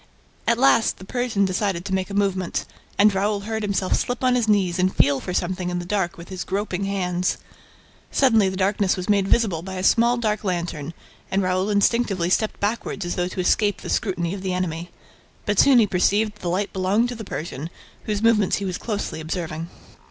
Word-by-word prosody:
At 235 - +3
last, 240 -3 +4
the 190 - -11
Persian 235 -3 0
decided 185 -1 -1
to 195 - -3
make 190 0 -1
a 200 - -5
movement; 190 -3 0 0.3
and 210 0 +5
Raoul 200 +1 0
heard 220 +1 -3
him 205 - -1
slip 200 +6 -1
on 255 -1 +4
his 240 -3 +1
knees 190 -4 +2
and 185 +1 +1
feel 140 -1 +3
for 180 - -5
something 180 0 -1
in 180 - -2
the 175 - -4
dark 185 -2 -1
with 170 0 -11
his 185 -2 -4
groping 195 -1 -2
hands. 180 -2 -1 0.7
Suddenly, 225 -7 +4
the 190 - -5
darkness 195 0 +1
was 185 - -4
made 200 -2 +3
visible 195 -8 +2
by 190 +2 -7
a 185 - -4
small 235 +4 +4
dark 215 -3 -1
lantern 170 -4 -3 0.3
and 195 0 +1
Raoul 185 +2 0
instinctively 200 -3 +1
stepped 215 +2 +1
backward 205 -2 -2
as 175 - -2
though 180 0 0
to 185 - -7
escape 205 +2 +1
the - - -5
scrutiny 180 -5 -1
of 200 - -5
a - - -10
secret 185 -1 -1
enemy. 175 -1 -3 0.6
But 205 -1 +1
he - - +7
soon 245 -6 +6
perceived 205 +3 +2
that 210 - -21
the 175 - -2
light 195 +3 -1
belonged 195 +6 +1
to 245 - -5
the 220 - -7
Persian, 160 -5 -5 0.4
whose 210 0 -2
movements 215 -4 +4
he 200 - -3
was 185 -2 -3
closely 205 -7 -3
observing. 165 0 -4
195 Hz, 210 wpm, -23 LUFS, 180-210 Hz, 0.7 s, he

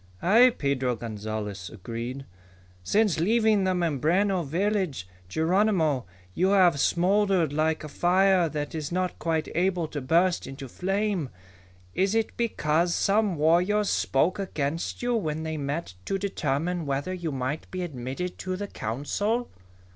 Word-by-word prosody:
"Aye," 230 +8 +6
Pedro 130 -3 0
Gonzalez 105 -3 -5
agreed. 115 +6 -6 0.6
"Since 200 - +2
leaving 215 +2 +3
the 185 -1 +1
Mimbreno 175 +4 +1
village, 175 - -1 0.2
Geronimo, 160 - +2 0.3
you 185 - +2
have 180 -6 +4
smoldered 185 -1 +2
like 155 +1 0
a - - -5
fire 180 +3 +3
that 145 -1 -4
is 155 -2 -4
not 185 +1 -2
quite 160 -2 -1
able 175 -1 +1
to 145 - -4
burst 170 +7 +2
into 135 0 -8
flame. 195 - -1 0.6
Is 195 +3 +1
it 225 -1 0
because 170 -7 +1
some 205 -2 +2
warriors 180 +7 +2
spoke 165 +9 +1
against 165 0 -3
you 245 0 +1
when 160 -7 -2
they 160 0 -3
met 145 - -3
to 195 - -1
determine 175 -3 -2
whether 140 +6 -2
you 175 -3 -3
might 135 +3 -3
be 185 -1 -4
admitted 140 +3 -5
to 185 0 -3
the 205 +2 -4
Council?" 200 - -2
170 Hz, 140 wpm, -26 LUFS, 140-195 Hz, 0.6 s, Aye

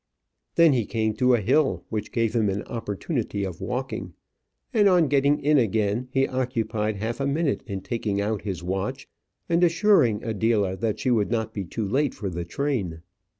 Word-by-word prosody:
Then 165 -3 +6
he 120 -5 0
came 110 -1 0
to 125 +1 +4
a 115 - -1
hill 105 - +2
which 105 -1 -4
gave 115 -1 0
him 110 -3 +2
an 100 +1 -2
opportunity 110 - -3
of 90 -4 -5
walking; 125 +2 -4 0.6
and 210 -4 +5
on 175 -4 +4
getting 140 +1 +3
in 150 0 +3
again 110 +1 0
he 135 +1 +1
occupied 115 -4 -1
half 110 +5 -3
a 135 - 0
minute 145 +1 0
in 100 -3 -4
taking 100 0 -2
out 105 0 -1
his 95 -4 -5
watch, 95 +9 -3 0.4
and 170 +1 +2
assuring 170 - +3
Adela 110 -3 +1
that 110 +1 -2
she 130 - 0
would 110 -4 +2
not 110 -1 -1
be 100 -3 -4
too 105 +4 -3
late 135 +6 0
for 100 -3 -4
the 85 0 -4
train. 95 - -2
115 Hz, 185 wpm, -25 LUFS, 100-135 Hz, 0.6 s, Then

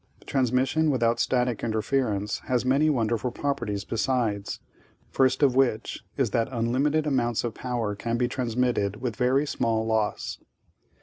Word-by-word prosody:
Transmission 135 +4 +1
without 120 -4 +2
static 125 -2 0
interference 110 -3 0
has 125 -1 0
many 140 +4 +3
wonderful 120 -3 0
properties, 120 -6 -2
besides, 115 -4 -1 0.5
first 130 +1 +2
of 135 -3 +5
which 125 -4 +1 0.2
is 130 -7 +1
that 115 +1 +1
unlimited 135 +6 +1
amounts 120 -5 +1
of 120 -2 -2
power 120 -4 -2
can 115 +3 -2
be 125 0 +1
transmitted 120 -5 0
with 120 -3 -3
very 130 +3 +2
small 115 -5 0
loss. 110 -2 -1
120 Hz, 135 wpm, -26 LUFS, 115-130 Hz, 0.5 s, of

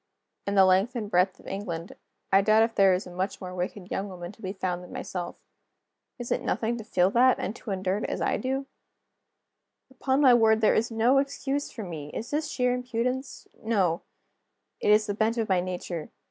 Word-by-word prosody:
In 200 - 0
the 190 -1 +7
length 190 +7 +3
and 215 -3 -4
breadth 180 +1 +2
of - - -18
England, 185 -3 -5 0.4
I 195 0 +6
doubt 215 +2 +5
if 225 0 0
there 195 -3 +5
is 185 - -4
a 180 - -10
much 185 +3 -3
more 180 -1 -7
wicked 180 +1 -5
young 200 +1 -2
woman 175 -1 -7
to 220 - -19
be 190 - -3
found 180 -2 -3
than 180 - -12
myself. 175 -2 -5 0.8
Is 245 -2 -6
it - - +1
nothing 230 +1 -1
to 225 - -7
feel 185 -3 +2
that, 255 +3 +5
and 210 - -3
to - - -10
endure 190 0 -1
it - - -3
as - - -3
I - - +1
do? 265 +1 -2 1.3
Upon 265 +1 0
my 265 -4 +7
word, 220 -2 +5
there 220 - +4
is 230 - +1
no 235 +4 +3
excuse 280 +1 -2
for 225 - -7
me! 160 -6 -7
Is 230 - -5
this 300 +1 -1
sheer 250 -4 +1
impudence? 250 +2 -3
No; 190 -7 +1 0.8
it - - 0
is 210 +1 +5
the 205 - -2
bent 220 +3 0
of 225 -2 0
my 190 -2 +3
nature. 175 -2 -4
210 Hz, 210 wpm, -27 LUFS, 185-240 Hz, 1.3 s, the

